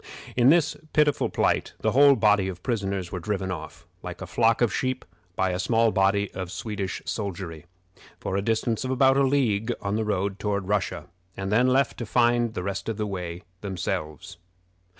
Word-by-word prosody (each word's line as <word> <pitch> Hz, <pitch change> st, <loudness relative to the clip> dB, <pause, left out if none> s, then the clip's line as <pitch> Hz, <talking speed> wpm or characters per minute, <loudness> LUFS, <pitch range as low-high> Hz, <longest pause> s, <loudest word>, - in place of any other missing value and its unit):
In 125 Hz, +1 st, +5 dB
this 165 Hz, 0 st, +4 dB, 0.2 s
pitiful 150 Hz, -2 st, +3 dB
plight -, -, 0 dB
the -, -, +2 dB
whole 140 Hz, +1 st, +7 dB
body 105 Hz, -5 st, +3 dB
of 90 Hz, -1 st, -6 dB
prisoners 100 Hz, -6 st, -2 dB
were 90 Hz, -, -3 dB
driven 95 Hz, 0 st, -2 dB
off, 85 Hz, 0 st, -7 dB, 0.2 s
like 90 Hz, -1 st, -7 dB
a 95 Hz, -, -5 dB
flock 115 Hz, +5 st, +2 dB
of 120 Hz, -3 st, +2 dB
sheep, 130 Hz, 0 st, -2 dB, 0.3 s
by 95 Hz, -1 st, +1 dB
a 90 Hz, -, -2 dB
small 115 Hz, +3 st, +3 dB
body 100 Hz, 0 st, +2 dB
of 95 Hz, -1 st, -5 dB
Swedish 100 Hz, -4 st, -4 dB
soldiery, 85 Hz, -6 st, -5 dB, 0.5 s
for 95 Hz, -, -3 dB
a 100 Hz, -, +1 dB
distance 115 Hz, +2 st, 0 dB
of 130 Hz, -, -3 dB
about 130 Hz, +1 st, +4 dB
a 140 Hz, -, +3 dB
league 120 Hz, -5 st, +1 dB
on 100 Hz, +1 st, -2 dB
the 110 Hz, -, 0 dB
road 100 Hz, -2 st, -1 dB
toward 100 Hz, -2 st, -2 dB
Russia, 100 Hz, -3 st, -1 dB, 0.3 s
and 95 Hz, 0 st, -3 dB
then 125 Hz, +4 st, +4 dB
left 130 Hz, +1 st, +2 dB
to 120 Hz, -, -4 dB
find 120 Hz, 0 st, +2 dB
the 90 Hz, -, -3 dB
rest 100 Hz, +2 st, -3 dB
of 110 Hz, -, -3 dB
the 105 Hz, -, -1 dB
way 90 Hz, -3 st, -5 dB, 0.2 s
themselves. 90 Hz, -2 st, -4 dB
100 Hz, 190 wpm, -26 LUFS, 95-120 Hz, 0.5 s, whole